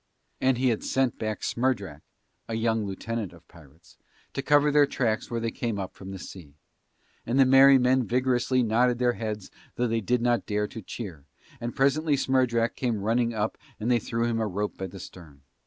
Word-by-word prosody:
And 130 -1 +3
he 130 +1 +2
had 115 - -1
sent 130 -2 0
back 110 -1 -3
Smerdrak 100 - -1 0.5
(a 115 - -2
young 110 -2 0
lieutenant 105 +1 -4
of 85 -1 -18
pirates) 80 0 -19 0.3
to - - -2
cover 145 +1 +4
their 145 -1 +5
tracks 115 -6 -1
where 115 - -2
they 115 0 -2
came 115 -3 -3
up 95 -2 -5
from 95 - -10
the 95 - -6
sea. 85 -6 -11 0.7
And 120 +4 0
the 135 - +7
merry 135 +1 +7
men 125 -1 +2
vigorously 125 +1 +1
nodded 120 +2 +2
their 125 0 +2
heads 110 -4 -5 0.2
though 125 - 0
they 115 -1 0
did 120 +3 0
not 120 -1 +1
dare 105 -1 0
to 110 - -8
cheer, 90 - -8 0.3
and 120 0 -5
presently 145 +3 +2
Smerdrak 125 -3 +1
came 120 -4 -1
running 115 +2 +1
up 105 0 -2 0.2
and 115 +3 0
they 120 - +4
threw 115 +2 -2
him 115 -1 0
a 110 - 0
rope 105 +2 -3
by 95 - -5
the 95 +2 -11
stern. 80 -6 -12
115 Hz, 200 wpm, -27 LUFS, 105-125 Hz, 0.7 s, the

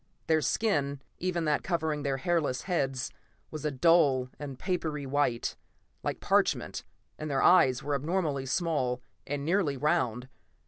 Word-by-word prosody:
Their 160 -1 +3
skin, 145 - 0 0.2
even 175 -2 -1
that 150 -1 +2
covering 160 -4 -1
their 140 -2 -1
hairless 145 -3 0
heads, 135 -8 -1 0.4
was 155 -1 -6
a - - +2
dull 140 -3 +4
and 140 -3 -6
papery 155 -5 -2
white, 135 -3 0 0.5
like - - -3
parchment, - - +1 0.4
and 155 - -4
their 135 -2 +1
eyes 135 -7 +5
were 145 +1 -1
abnormally 145 -2 -1
small, 130 -5 0 0.2
and 145 0 -3
nearly 165 -5 +1
round. 130 -5 0
145 Hz, 140 wpm, -29 LUFS, 135-165 Hz, 0.5 s, eyes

